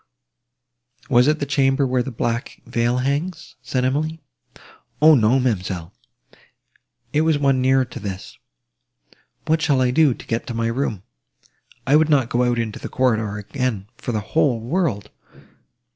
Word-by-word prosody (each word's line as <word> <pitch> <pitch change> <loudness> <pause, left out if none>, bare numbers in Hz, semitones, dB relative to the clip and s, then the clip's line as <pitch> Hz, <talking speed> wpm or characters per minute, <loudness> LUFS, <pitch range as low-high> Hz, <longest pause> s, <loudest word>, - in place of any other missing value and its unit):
"Was 125 +1 +5
it 155 0 +3
the 145 - -3
chamber 140 0 +2
where 130 -1 +1
the 125 - -4
black 120 0 -3
veil 120 +1 0
hangs?" 145 +7 -3
said 125 -1 -1
Emily. 155 +5 -1 0.8
"O! 155 +1 +7
no, 120 0 +4
ma'amselle, 95 -7 -2 1.2
it 150 - +3
was 160 -1 +2
one 135 -2 +2
nearer 130 0 +3
to 125 0 -9
this. 100 -3 -7 1.1
What 160 0 +1
shall 140 -4 +2
I 125 -1 +2
do, 145 -2 +3
to - - -13
get 115 0 -3
to 120 - -5
my 115 0 0
room? 115 -6 -2 0.8
I 135 - +4
would 155 0 +2
not 135 -6 +3
go 120 - +1
out 120 -1 +1
into 115 -2 -3
the - - -7
corridor 110 -5 0
again, 105 -1 -3
for 120 - -5
the 110 -2 -1
whole 125 +1 +1
world!" 115 - -2
125 Hz, 160 wpm, -21 LUFS, 115-140 Hz, 1.2 s, O